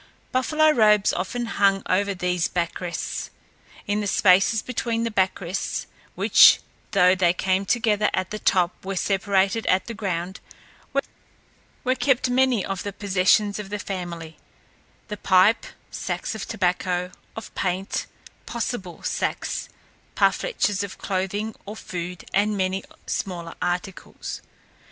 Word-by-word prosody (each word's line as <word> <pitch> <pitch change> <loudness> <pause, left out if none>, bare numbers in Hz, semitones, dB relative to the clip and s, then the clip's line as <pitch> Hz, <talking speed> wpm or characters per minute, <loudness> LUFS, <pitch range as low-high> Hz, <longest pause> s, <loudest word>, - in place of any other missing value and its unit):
Buffalo 305 +5 +3
robes 210 -6 +4
often 240 +7 -2
hung 200 -3 +2
over 200 +1 +1
these 180 -1 0
back 170 0 -2
rests. 175 -1 -4 0.6
In 205 +1 0
the 205 - -2
spaces 195 +3 +4
between 230 -2 -2
the 230 - -1
back 190 -2 +1
rests, 180 0 -3 0.3
which - - +7 0.3
though 185 -3 +5
they 180 -2 +3
came 190 +1 0
together 215 -3 +2
at 185 0 -2
the 215 - -4
top 180 -3 +1
were 195 +1 -4
separated 195 +2 +1
at 185 0 +3
the 230 - -6
ground, 190 -3 -3 1.4
were 255 - +2
kept 260 -2 +1
many 255 -5 +3
of 195 -2 -3
the 205 - -4
possessions 200 +1 +2
of 200 -2 -6
the 210 - -3
family; 175 -5 -6 0.7
the 210 -2 -5
pipe, 190 +4 +4 0.2
sacks - - -3
of 220 - -6
tobacco, 180 -3 -1 0.2
of 225 - -8
paint, 190 +1 -2 0.4
"possible 230 -6 -4
sacks" - - -2 0.5
parfleches 220 - +1
for 200 -2 -4
clothing 200 +3 -2
or 210 - -6
food, 180 -3 -6
and 205 +1 +2
many 190 0 -1 0.2
smaller 170 -3 -4
articles. 180 +2 -4
195 Hz, 130 wpm, -24 LUFS, 185-215 Hz, 1.4 s, which